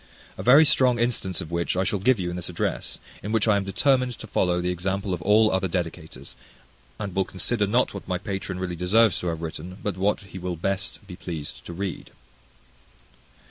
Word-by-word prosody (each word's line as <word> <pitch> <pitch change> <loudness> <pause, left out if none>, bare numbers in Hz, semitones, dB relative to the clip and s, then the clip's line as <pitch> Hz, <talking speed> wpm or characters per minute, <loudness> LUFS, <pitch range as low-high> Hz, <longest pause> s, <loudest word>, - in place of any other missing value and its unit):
A - - -6
very 140 +6 +7
strong 130 -5 +4
instance 115 -6 -1
of 85 -2 -8
which 85 +1 -1
I 95 - +3
shall 100 +1 0
give 120 +3 +3
you 90 -1 -2
in - - -5
this 90 0 -3
address, 85 - -2 0.2
in 105 - -4
which 110 -1 +2
I 105 - +5
am 100 - +1
determined 125 +4 +1
to - - -8
follow 90 -1 +1
the 90 0 0
example 95 +2 -2
of 90 - -3
all 110 +4 +5
other 95 0 +1
dedicators, 85 -6 -5 0.6
and 100 -3 -5
will 95 - +3
consider 105 +3 0
not 120 +5 +2
what 100 - -8
my 90 0 0
patron 95 -2 -4
really 90 -1 -3
deserves 95 +4 +3
to 90 - -4
have 80 -1 -3
written, 85 +3 -6
but 100 -3 -2
what 100 +2 +1
he 95 -1 -10
will 90 -1 -3
be 80 - -16
best 100 +3 -1 0.2
pleased 80 -5 -6
to 85 - -7
read. 95 -1 -4
95 Hz, 210 wpm, -25 LUFS, 90-105 Hz, 0.6 s, very